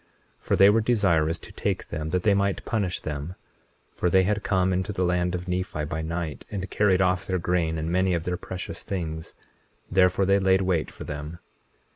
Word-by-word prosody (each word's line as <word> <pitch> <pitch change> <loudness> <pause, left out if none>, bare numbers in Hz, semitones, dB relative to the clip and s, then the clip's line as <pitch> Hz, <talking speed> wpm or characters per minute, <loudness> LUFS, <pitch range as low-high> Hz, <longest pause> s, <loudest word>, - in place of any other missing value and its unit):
21:21 - - -30
For - - +3
they 100 +1 +7
were 115 +2 +3
desirous 90 -9 +2
to - - -12
take - - -3
them 75 0 -4
that 90 +1 0
they 105 - +4
might 100 0 0
punish 100 -5 -1
them; 75 +3 -5 0.6
for 90 - 0
they 95 +2 +5
had 105 +2 0
come 95 -2 +1
into 95 +3 -1
the 95 -2 -1
land 90 0 +1
of 90 +1 -5
Nephi 90 -4 -2
by 80 +1 -3
night, 80 -2 -4
and 95 -2 -4
carried 95 -3 +3
off 90 0 0
their 95 - 0
grain 85 -2 0
and 80 +1 -2
many 95 0 +2
of 85 - -2
their 90 +1 -1
precious 90 -1 -6
things; 80 -4 -5 0.6
therefore 95 +1 +4
they 100 +1 +4
laid 95 0 +3
wait 90 -4 0
for - - -10
them. 75 +2 -6
90 Hz, 205 wpm, -26 LUFS, 85-95 Hz, 0.6 s, they